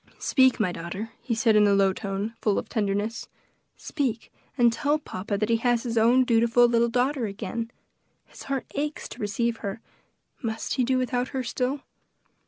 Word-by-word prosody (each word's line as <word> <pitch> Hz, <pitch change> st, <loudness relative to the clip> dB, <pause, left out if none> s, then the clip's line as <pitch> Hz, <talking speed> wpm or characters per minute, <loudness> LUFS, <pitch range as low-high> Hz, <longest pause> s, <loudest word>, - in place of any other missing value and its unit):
"Speak, 260 Hz, -2 st, +3 dB
my 195 Hz, -5 st, +1 dB
daughter," 175 Hz, +6 st, -6 dB
he 235 Hz, -, -2 dB
said 225 Hz, -1 st, +3 dB
in 210 Hz, -1 st, +6 dB
a 200 Hz, -, +4 dB
low 195 Hz, -1 st, +3 dB
tone, 200 Hz, +3 st, -4 dB
full 210 Hz, -2 st, +2 dB
of -, -, -3 dB
tenderness; 210 Hz, +1 st, -2 dB, 0.5 s
"speak, 250 Hz, -7 st, -3 dB, 0.2 s
and 240 Hz, -2 st, +5 dB
tell 290 Hz, +5 st, +1 dB
papa 200 Hz, -8 st, -4 dB
that 215 Hz, +2 st, -1 dB
he 230 Hz, -, +4 dB
has 240 Hz, 0 st, +1 dB
his 235 Hz, -2 st, -3 dB
own 235 Hz, +3 st, +5 dB
dutiful 235 Hz, 0 st, +4 dB
little 235 Hz, 0 st, +2 dB
daughter 250 Hz, 0 st, 0 dB
again. 225 Hz, +3 st, -4 dB, 0.6 s
His -, -, -14 dB
heart 270 Hz, -1 st, -1 dB
aches 295 Hz, +1 st, -3 dB
to -, -, -10 dB
receive 225 Hz, +3 st, -1 dB
her; 200 Hz, 0 st, -5 dB, 0.6 s
must 225 Hz, -3 st, -3 dB
he 255 Hz, -, +1 dB
do 260 Hz, +1 st, +2 dB
without 250 Hz, 0 st, 0 dB
her 260 Hz, -1 st, -3 dB
still?" 255 Hz, +3 st, -2 dB
230 Hz, 180 wpm, -26 LUFS, 210-250 Hz, 0.6 s, in